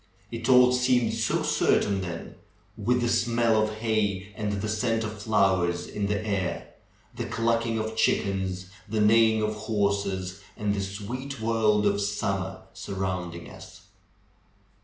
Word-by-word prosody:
It 115 +1 -4
all 125 -1 +7
seemed 125 -2 +2
so - - 0
certain 100 -1 +2
then, 85 -2 -6 0.4
with 125 +1 +1
the 120 - +1
smell 115 -1 +2
of 110 0 -1
hay 105 -3 -1
and 105 -2 -2
the 100 +1 -2
scent 110 +1 0
of 105 -1 -6
flowers 95 -5 +2
in 100 -1 -3
the 105 +1 -1
air, 95 -5 -2 0.4
the - - -3
clucking 115 0 0
of 110 0 -3
chickens, 95 -4 0 0.2
the 110 +1 -1
neighing 110 +1 +4
of 105 0 0
horses, 100 -3 -1 0.2
and 105 -1 0
the 100 - -1
sweet 120 +8 -5
world 110 -2 +2
of 100 0 +2
summer 95 -2 -2
surrounding 90 -3 -4
us. - - -14
105 Hz, 140 wpm, -27 LUFS, 95-115 Hz, 0.4 s, all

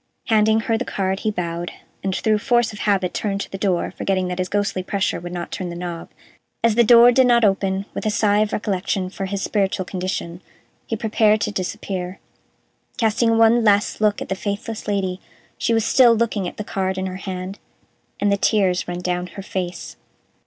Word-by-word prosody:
Handing 220 0 +4
her 225 +1 0
the - - -1
card 190 -3 -2
he 215 - -1
bowed, 170 -3 -3 0.3
and, 190 -1 -1
through 215 -1 +1
force 240 -1 +2
of 205 - -9
habit, 190 -3 +1
turned 200 -2 -2
to - - -7
the 195 - -4
door, 185 -3 0
forgetting 185 -2 -1
that 180 0 -4
his 185 0 -1
ghostly 205 -2 0
pressure 190 0 -1
would 175 +1 -7
not 175 -1 -5
turn 185 -2 -4
the 170 - -6
knob. 175 -1 -6 0.5
As 230 -1 +4
the 235 +2 +5
door 235 +1 +8
did 255 +1 +4
not 235 -2 +5
open, 195 0 +1
with - - -3
a - - +3
sigh 210 -1 +2
of 215 0 +1
recollection 190 -2 -2
for 195 - -4
his 195 0 -3
spiritual 195 -3 0
condition, 180 -2 -4 0.5
he 225 - -1
prepared 215 -1 +2
to 210 - -1
disappear, 185 -1 -4 0.8
casting 230 -1 +2
one 225 +1 +5
last 205 0 +2
look 210 -1 +2
at - - -13
the - - +1
faithless 205 +3 -5
Lady. 190 -3 -1 0.4
She - - 0
was 225 -1 +2
still 240 -2 +6
looking 220 -4 0
at - - -8
the 210 - -3
card 190 -2 -2
in 190 - -2
her 185 -1 -4
hand, 190 +1 -6 0.6
and 205 0 +2
the 200 - +2
tears 195 -3 +1
ran 175 0 -4
down 180 0 -2
her 195 +2 -9
face. 180 -2 -5
200 Hz, 200 wpm, -21 LUFS, 185-215 Hz, 0.8 s, door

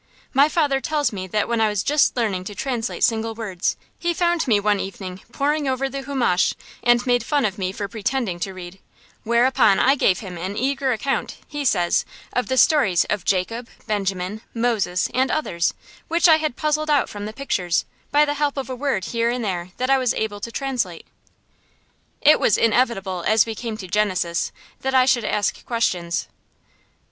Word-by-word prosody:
My 280 +2 +5
father 290 -4 +1
tells 295 -2 0
me 185 -2 -5
that 210 +3 0
when 235 -1 0
I 220 - +4
was 210 -2 -1
just 290 -2 +2
learning 205 -6 0
to 205 - -7
translate 245 -2 -3
single 225 -1 +1
words, 200 -6 -2 0.2
he 345 -1 -1
found 345 -3 +1
me 215 -4 +4
one 205 0 +1
evening 190 -1 -6
poring 290 +2 0
over 265 +1 0
the 275 +1 -5
humesh 245 - +1 0.3
and 240 0 +3
made 245 -2 +2
fun 285 -1 +1
of 200 -1 -2
me 185 -1 -1
for 200 +1 -4
pretending 220 -2 -2
to 190 +3 -3
read; 180 +1 -9 0.4
whereupon 235 -3 +3
I 270 - +5
gave 195 -9 +2
him 180 -4 -7
an 190 +4 -4
eager 270 +1 0
account, 270 +4 -2
he 290 -1 -4
says, 175 -9 +2 0.3
of 250 - 0
the 260 - -1
stories 210 - +4
of 210 -3 -1
Jacob, 225 +6 -1 0.2
Benjamin, 195 -1 -2
Moses, 225 -6 +1
and 260 +1 +2
others, 170 - 0 0.3
which 340 +2 +3
I 320 -2 +7
had 310 -5 -2
puzzled 305 0 0
out 290 -2 +3
from 205 0 -6
the - - -5
pictures, 190 -9 -1 0.2
by 295 +1 +4
the 290 - -1
help 290 -1 -1
of 265 -2 -4
a - - -3
word 255 -8 -1
here 230 0 0
and 240 -1 -2
there 180 -3 -3
that 255 +1 0
I 270 - +5
was 255 -2 +1
able 215 -2 -2
to 230 +3 -6
translate. 240 -10 -3 1.2
It 300 +1 +6
was - - +3
inevitable, 210 -6 +1
as 220 0 +4
we 225 - -4
came 220 0 -5
to 190 - -8
Genesis, 185 -4 0 0.3
that 265 0 -1
I 255 -1 +6
should 240 -4 +2
ask 205 -2 -1
questions. 180 -8 -1
230 Hz, 190 wpm, -22 LUFS, 195-270 Hz, 1.2 s, I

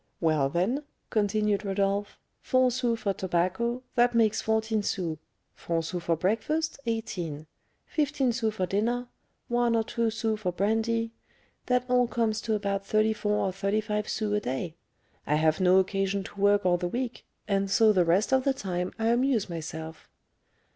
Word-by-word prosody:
"Well, 155 -4 +2
then," 185 - 0 0.3
continued 210 -1 +1
Rodolph, 200 +1 -1 0.2
"four 255 -1 +3
sous 240 -2 0
for 200 - 0
tobacco; 190 +8 -1
that 240 -1 +3
makes 225 -1 +3
fourteen 220 0 0
sous; 170 -6 -2 0.3
four 165 -1 -2
sous 175 +2 -4
for 170 -1 +1
breakfast, 280 - -1
eighteen; 175 -9 -3 0.4
fifteen 285 -5 0
sous 225 -2 0
for 185 - 0
dinner; 235 +6 -1 0.4
one 240 -1 +2
or 225 - +2
two 230 +1 -1
sous 220 -1 -1
for 185 -4 -1
brandy; 225 +4 0 0.6
that 250 0 +2
all 250 -1 +3
comes 225 -2 0
to 220 -2 0
about 200 -1 -1
thirty 215 +2 +2
four 210 -1 0
or 190 - 0
thirty 195 +3 0
five 210 0 -2
sous 215 -2 -1
a - - +2
day. 155 0 -3 0.5
I 150 - +2
have 155 +3 +2
no 185 0 +5
occasion 195 +1 +1
to 200 - -9
work 205 -1 +4
all 175 -1 +4
the 175 0 -2
week, 245 +5 -4 0.2
and 195 -1 +1
so 220 +2 +5
the 185 -3 +4
rest 185 +9 +2
of 265 -1 +4
the 275 - +2
time 180 -5 -3
I 225 0 +1
amuse 240 -5 +1
myself." 160 -1 -7
210 Hz, 170 wpm, -28 LUFS, 185-230 Hz, 0.6 s, no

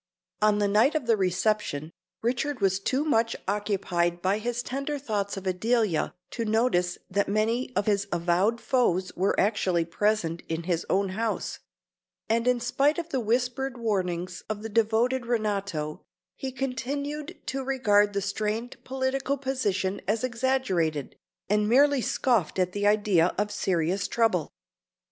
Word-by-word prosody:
On 210 -1 +4
the 205 -1 +2
night 215 +9 +3
of 305 -5 0
the 230 -1 +4
reception, 185 -5 0 0.3
Richard 255 +4 -1
was 195 -1 +2
too 260 +8 0
much 230 -6 +2
occupied 190 -4 0
by 190 +4 +1
his 240 +2 -2
tender 275 +3 -3
thoughts 210 -7 -2
of 195 - -7
Adelia 200 -1 +1 0.2
to 235 - -3
notice 215 -5 +1
that 200 +2 0
many 225 +5 0
of 200 - +1
his 205 -1 +1
avowed 175 +7 +1
foes 190 -10 +1
were 190 +3 +1
actually 185 -5 +2
present 170 -1 0
in 165 +1 -2
his 170 -1 -1
own 195 +1 +2
house; 220 +4 -2 0.7
and 230 +2 +1
in 250 -1 +3
spite 275 +5 +2
of 340 -1 -4
the 270 - 0
whispered 250 +3 -1
warnings 185 -5 -2
of 215 0 -4
the 225 - -4
devoted 230 +3 +1
Renato, 200 -9 -1 0.3
he 265 - -5
continued 275 +3 -4
to 270 0 -3
regard 210 -6 +3
the 200 - 0
strained 215 +4 -3
political 265 +1 -1
position 205 -8 -1
as 215 +3 0
exaggerated, 235 - 0 0.3
and 210 +1 +2
merely 280 +2 +5
scoffed 225 -10 +1
at 180 -1 +1
the 205 +2 0
idea 205 -5 +3
of 210 +1 0
serious 180 -1 0
trouble. 220 -9 +1
215 Hz, 150 wpm, -27 LUFS, 190-245 Hz, 0.7 s, merely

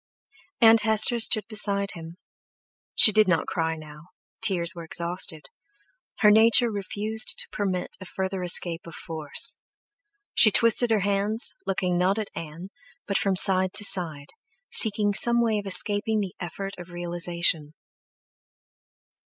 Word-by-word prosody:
Aunt 225 -1 +5
Hester 220 +2 +4
stood 220 -1 +2
beside 200 -2 0
him. 165 +1 -12 0.8
She 215 - +6
did 215 0 +2
not 170 -3 0
cry 160 -1 -3
now, 155 +1 -14 0.3
tears 185 -5 +1
were 170 -2 -10
exhausted—her 180 - -4
nature 230 +2 +3
refused 210 +2 -3
to - - -4
permit 190 -3 -5
a - - -9
further 190 +1 -6
escape 175 -1 0
of 170 - -11
force; 155 -3 -2 0.8
she 220 - +5
twisted 230 +3 +2
her 220 -2 0
hands, 205 +3 -1
looking 180 -2 -2
not 190 +3 0
at 215 -2 -6
Ann, 165 +4 -10 0.3
but 200 - -2
from 195 -1 -1
side 185 0 +5
to 205 - +5
side, 160 -8 -1 0.4
seeking 205 -2 +4
some 235 +3 +2
way 225 -3 -1
of 205 - -9
escaping 210 +3 +2
the 195 -3 -5
effort 195 +3 -8
of 175 0 -12
realization. 170 -3 -3
195 Hz, 135 wpm, -23 LUFS, 175-215 Hz, 0.8 s, She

